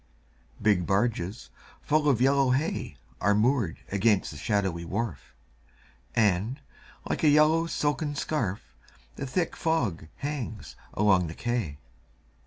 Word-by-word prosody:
Big 100 -5 +2
barges 100 0 -1 0.3
full 150 0 +2
of 130 -5 +3
yellow 135 +1 +4
hay 135 +6 -1 0.2
Are 100 +2 +3
moored 110 - +2
against 100 0 +2
the 75 - -9
shadowy 95 -1 -1
wharf, 105 - -4 0.8
And, 110 +4 +2 0.5
like - - -2
a 155 - +6
yellow 155 +3 +4
silken 145 -1 -1
scarf, 120 -10 -1 0.5
The 140 - -5
thick 170 +6 -1
fog 120 - -1
hangs 140 -7 -5 0.2
along 95 -4 +3
the 80 - -7
quay. 120 -12 -2
115 Hz, 120 wpm, -28 LUFS, 95-145 Hz, 0.8 s, a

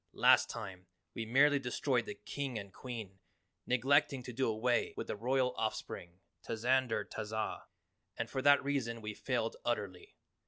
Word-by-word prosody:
Last - - +5
time, 95 -5 -7 0.3
we 115 -2 -4
merely 140 +4 +5
destroyed 125 0 0
the 210 - -5
King 140 - -4
and 100 -2 -7
Queen, 110 -7 -7 0.5
neglecting 135 +2 +3
to 125 - -7
do 130 +3 +1
away 120 +3 +1
with - - -3
the - - -3
Royal 125 +3 +1
Off 110 -1 0
spring, 85 +1 -8 0.2
Tazander 125 +1 +1
Tazah, 110 0 -4 0.5
and 115 - -2
for 130 +3 -3
that 145 +1 +6
reason 125 -5 -1
we 105 0 -4
failed 115 0 -2
utterly. 100 -6 -3
120 Hz, 155 wpm, -34 LUFS, 110-130 Hz, 0.5 s, that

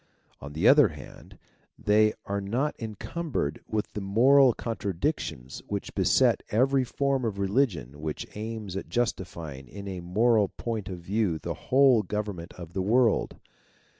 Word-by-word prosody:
On 70 +1 -9
the 85 +9 +2
other 145 +1 +7
hand, 75 -3 -12 0.4
they 110 +1 +3
are 100 0 -2
not 120 +10 -1
encumbered 110 - -3
with 110 -1 -3
the 105 - -4
moral 125 +7 +5
contradictions 90 - -3
which - - -4
beset - - +3
every 130 +4 +3
form 135 +1 -1
of 110 -4 -2
religion 95 - 0
which 75 -1 -4
aims 110 -3 -5
at 95 - -5
justifying 85 - -3
in 100 +8 -9
a 95 -2 -5
moral 105 +4 +2
point 110 -4 -4
of 90 - -5
view 95 -1 0
the - - -4 0.2
whole 130 -3 +6
govern 105 -2 -3
ment 85 +1 -9
of 85 -1 -10
the 95 - -1
world. 115 +3 +2
105 Hz, 150 wpm, -27 LUFS, 90-120 Hz, 0.4 s, other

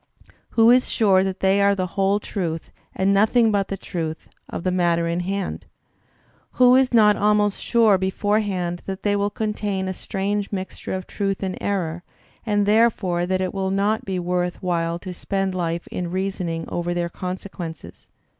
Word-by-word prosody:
Who 225 +1 +7
is 250 +1 +4
sure 195 -4 +3
that 190 0 -3
they 195 +1 +3
are 200 0 +4
the 185 -1 -1
whole 195 +1 +2
truth, 170 -6 -4 0.2
and 195 +1 +2
noth 210 +4 +3
ing 230 -2 +5
but 200 -2 +1
the 195 - -4
truth, 165 -4 -5 0.2
of - - -5
the 185 - +1
matter 170 -2 +1
in 170 +1 -1
hand? 195 +1 -3 0.9
Who 250 0 +6
is 260 -1 +4
not 210 -3 +5
almost 210 -1 +2
sure 225 -5 +4
beforehand 190 -2 -1
that 190 -1 -5
they 205 -1 +2
will 200 0 +1
contain 205 -2 -2
a 190 - -2
strange 200 +2 -3
mixture 190 -1 -4
of 185 -1 -5
truth 195 -1 -2
and 185 -1 -2
error, 175 -4 -2 0.5
and 205 -1 +2
therefore 205 -5 +2
that 185 0 0
it 185 - -2
will 190 -1 -1
not 200 +3 +1
be 190 -1 -3
worth 180 +1 -2
while 170 -2 0
to 180 +1 -7
spend 195 +1 -2
life 170 -2 -2
in 175 -1 -3
reasoning 180 -3 -2
over 175 0 -2
their 175 0 0
conse 185 +3 -5
quences? 165 -5 -9
190 Hz, 180 wpm, -23 LUFS, 180-205 Hz, 0.9 s, Who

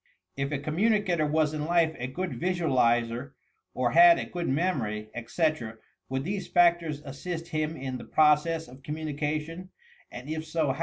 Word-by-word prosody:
If 140 +1 -2
a 145 - 0
communicator 175 +2 +1
was 155 0 +1
in 150 -1 -3
life 165 -2 +2
a 125 - -3
good 180 +7 -4
visualizer 125 -8 +1 0.4
or 125 -1 +1
had 170 +1 +8
a - - -3
good 175 -4 -4
memory, 120 - -1
etc., 120 -1 -2 0.3
would 130 0 -2
these 190 +2 -3
factors 170 -4 +2
assist 165 +5 -6
him 155 +1 -2
in 130 -2 -5
the - - -9
process 155 +2 +3
of 130 +2 -14
communication, 155 +3 -4 0.2
— 475 - -29
and 125 +3 -9
if 155 +1 -3
so. 155 -4 0
155 Hz, 160 wpm, -28 LUFS, 135-170 Hz, 0.4 s, had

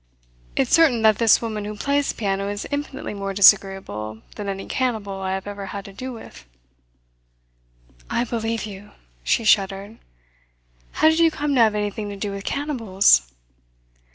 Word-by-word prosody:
"It's - - 0
certain 280 -9 +4
that 215 -2 +4
this 230 0 +4
woman 215 -2 -3
who 210 0 -6
plays 280 +5 0
the - - -2
piano 195 -2 -2
is 205 0 -4
infinitely 285 -4 -4
more 195 -1 -5
disagreeable 190 - +3
than 205 -1 -5
any 195 0 -5
cannibal 215 -7 -2
I 190 0 -2
have 190 - -6
ever 200 -1 -6
had 200 +1 -7
to 200 - -11
do 255 +6 -6
with." 225 - -11 1.7
"I - - 0
believe 225 -2 -3
you!" 205 -1 -11 0.3
She 230 - +1
shuddered. 200 0 +1 0.9
"How - - +3
did 320 +1 +1
you 330 -1 +5
come 295 -2 -2
to 255 - +4
have 220 -2 +4
anything 210 0 -3
to 200 - -6
do 200 0 -3
with 195 0 -7
cannibals?" 210 - +2
210 Hz, 165 wpm, -22 LUFS, 195-235 Hz, 1.7 s, you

